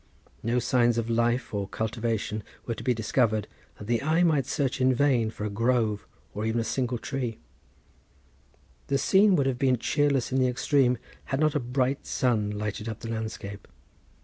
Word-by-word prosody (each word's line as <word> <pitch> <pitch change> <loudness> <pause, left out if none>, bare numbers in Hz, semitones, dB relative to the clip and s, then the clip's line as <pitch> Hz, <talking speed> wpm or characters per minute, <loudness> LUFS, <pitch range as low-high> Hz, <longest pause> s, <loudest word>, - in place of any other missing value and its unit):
No 115 +2 0
signs 120 -1 +2
of 115 0 -1
life 120 +2 +1
or 100 -1 -2
cultivation 110 -1 -2 0.2
were 115 - -2
to - - -8
be 130 - +2
discovered, 110 -1 +1 0.3
and 105 - -9
the 120 0 +1
eye 160 +4 +2
might 150 -6 +2
search 135 -2 -1
in 130 0 +4
vain 125 -4 +2
for 105 -1 -6
a - - -1
grove 115 -1 0 0.3
or 105 - -4
even 110 +1 0
a - - 0
single 125 +2 -1
tree. 120 -2 -4 1.5
The 140 - +1
scene 190 +7 +4
would 140 - +2
have 130 -2 -1
been 130 -2 +3
cheerless 140 +1 +1
in 130 - +2
the 130 - +3
extreme 125 0 +2 0.3
had 135 - -2
not 155 -1 +3
a 150 - +1
bright 130 +2 -1
sun 115 -6 +1
lighted 105 +1 -4
up 110 - -6
the 115 - -5
landscape. 110 -2 -5
120 Hz, 180 wpm, -27 LUFS, 110-135 Hz, 1.5 s, in